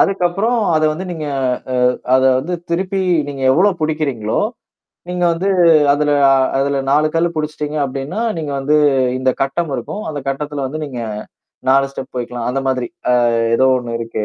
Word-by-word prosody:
அதுக்கப்புறம் 195 +5 +1 0.2
அத 155 - +1
வந்து 185 +4 -6
நீங்க 155 -3 -5 0.5
அ - - -1 0.4
அத 130 - +4 0.2
வந்து 170 +7 -3 0.2
திருப்பி 190 +3 -1 0.3
நீங்க 135 -2 -6
எவ்ளோ 190 +8 +4
புடிக்கிறீங்களோ? 140 -9 -1 0.7
நீங்க 180 0 -2
வந்து 185 +4 -1 0.4
அதுல 150 0 +1 0.5
அதுல 140 0 0
4 150 +2 +3
கல்லு 170 +1 +2
புடிச்சுட்டீங்க 150 0 -3
அப்டீன்னா, 140 - -4 0.2
நீங்க 150 -3 -4
வந்து 150 +3 +2 0.4
இந்த 130 0 +1
கட்டம் 155 +3 -2
இருக்கும். 165 - -5
அந்த 145 - -4
கட்டத்துல 145 0 -3
வந்து 155 +3 -5
நீங்க 125 -5 -6 0.7
4 135 +1 +4
ஸ்டெப் 130 -1 -8
வைக்கலாம். 120 -1 -4
அந்த 135 +2 -1
மாதிரி. 125 -2 -1 0.2
அ - - +4 0.4
ஏதோ 130 - +3
ஒண்ணு 120 -1 -4
இருக்கு. 115 -2 -3
150 Hz, 155 wpm, -17 LUFS, 130-170 Hz, 0.7 s, அத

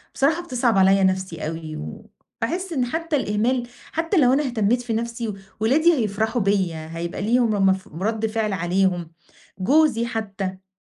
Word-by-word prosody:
بصراحة 315 +5 +2
بتصعَب 245 - +1
عليَّ 195 +1 +5
نفسي 185 -4 0
أوي، 160 -1 -5
وباحس 325 - -6
إن 255 -4 +1
حتّى 320 +4 -2
الإهمال 240 +1 0 0.2
حتّى 330 +4 0
لو 255 -3 +5
أنا 295 +2 +2
اهتمّيت 240 0 +1
في 235 -2 -3
نفسي 230 -1 -3 0.3
ولادي 305 +10 +4
هيفرحوا 220 -1 0
بيَّ، 195 -3 +1
هيبقى 165 +3 -5
ليهم 230 0 +2
امف 190 -1 +2
رد 215 +7 -2
فعل 215 -2 -1
عليهم، 175 -1 0 0.5
جوزي 265 +1 +3
حتّى. 195 -4 -4
220 Hz, 145 wpm, -23 LUFS, 190-250 Hz, 0.5 s, عليَّ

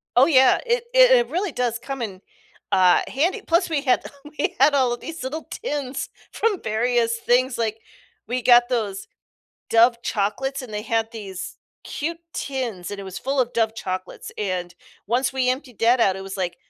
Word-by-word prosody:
Oh 250 - +7
yeah, 265 -5 +5
it 475 0 +1
it - - +7
it 485 -1 +4
really 365 +2 -1
does 240 -3 -1
come 270 +1 -6
in, 195 -4 -5 0.5
uh, 185 -2 +5
handy, 345 - 0
plus 345 +2 +2
we 305 -3 0
had 255 -3 +2 0.3
we - - -1
had 285 +2 +6
all 255 -3 +3
of 240 - -6
these 325 -4 -7
little 305 +5 -5
tins 280 - -4 0.2
from 425 -4 0
various 230 +1 +1
things, 250 +2 +1
like, 225 -1 -2 0.5
we 250 +1 -2
got 240 0 +6
those 215 -6 -2 0.6
Dove 235 +1 +4
chocolates 245 +7 -2
and 220 -4 -9
they 210 - -3
had 225 0 0
these 195 -4 -7 0.3
cute 330 +3 -4 0.2
tins 240 -10 -4
and 205 - -6
it 195 - -7
was 190 0 -7
full 270 +1 -1
of 245 -1 0
Dove 225 -1 +1
chocolates 185 -3 -6
and 180 -3 -3 0.3
once 245 +3 +1
we 260 -1 0
emptied 255 -4 -5
that 235 +2 +4
out, 190 -4 +3
it 190 - -7
was, 195 0 -7
like, 175 -2 -2
245 Hz, 185 wpm, -23 LUFS, 215-275 Hz, 0.6 s, Oh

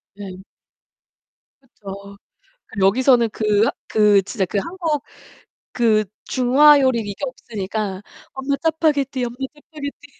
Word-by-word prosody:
네. 195 -2 -8 1.2
그쵸. 200 -5 -11 0.5
그 215 - -7
여기서는 235 +4 +4
그 210 -1 +2
하 - - +2 0.2
그 210 -2 +4
진짜 195 +1 -2
그 200 - -2
한국 325 - -2 0.7
그 220 -3 +2 0.2
중화요리 265 0 +5
이게 205 -2 -5
없으니까 210 -6 -5 0.3
"엄마, 270 +1 -1
짜파게티, 290 -5 +1
엄마, 240 0 -6 0.2
짜파게티." 295 -1 -9
240 Hz, 230 characters per minute, -21 LUFS, 205-280 Hz, 1.2 s, 중화요리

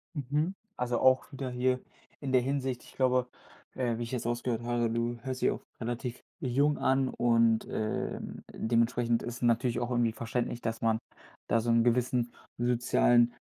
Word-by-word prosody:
Mhm. 150 +7 -1 0.2
Also 120 -1 0
auch 130 +1 +4
wieder 135 -1 -4
hier 125 +1 +1 0.4
in 135 -2 -3
der 130 -1 +5
Hinsicht, 130 -1 -2
ich - - -16
glaube, 125 -1 +2 0.5
äh, 120 -3 0
wie 120 - -3
ich 115 - -6
jetzt 125 -3 -3
rausgehört 120 0 -1
habe, 120 -1 +1
du 115 +1 -1
hörst 130 -1 -4
dich - - +4
auch - - -5 0.2
relativ 120 +1 -4 0.2
jung 140 +4 +2
an 130 0 +2
und, 115 -2 +3
ähm, 110 0 -3
dementsprechend 115 +1 +1
ist 120 - -4
es - - -10
natürlich 120 0 +2
auch 120 - -2
irgendwie 120 -2 +2
verständlich, 120 0 -2
dass 115 0 -3
man 110 -1 +2 0.5
da 115 - +3
so 120 +1 -2
'n 115 0 +5
gewissen 120 0 +1 0.3
sozialen 120 0 +3
120 Hz, 175 wpm, -30 LUFS, 115-130 Hz, 0.5 s, der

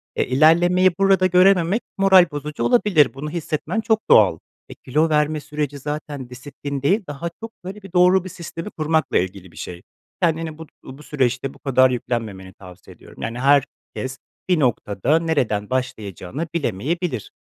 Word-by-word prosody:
Eee, - - 0
ilerlemeyi 175 +7 +4
burada 195 -1 +4
görememek 185 +2 +4 0.2
moral 190 -2 +6
bozucu 150 +1 -5
olabilir, 205 - +3
bunu 145 +3 -6
hissetmen 170 +6 -3
çok 220 -1 +1
doğal. 95 -7 +5 0.3
Eee, - - -10
kilo 155 +5 +1
verme 150 0 +1
süreci 145 -1 -4
zaten 145 -2 -6
disiplin 140 +2 -7
değil, 195 +9 +2
daha 150 +4 -5
çok 225 0 -7
böyle 195 +3 -8
bir 190 -2 -13
doğru 180 +1 +4
bir 185 - -7
sistemi 170 +3 -7
kurmakla 160 -1 0
ilgili 95 -1 -3
bir - - -19
şey. 90 0 -7 0.4
Kendini 165 -2 0
but 160 -1 -11
uuu, 130 +1 -11
bu 150 - -14
süreçte 135 -2 -1
bu - - -19
kadar 130 -1 +3
yüklenmemeni 110 -6 -4
tavsiye 90 -1 -14
ediyorum. - - -15
Yani, 115 +2 -4
herkes 135 -1 0 0.3
bir 175 -3 +3
noktada 125 - +1
nereden 125 -11 -1
başlayacağını 125 - -4
bilemeyebilir. 150 - -2
150 Hz, 160 wpm, -21 LUFS, 130-175 Hz, 0.4 s, moral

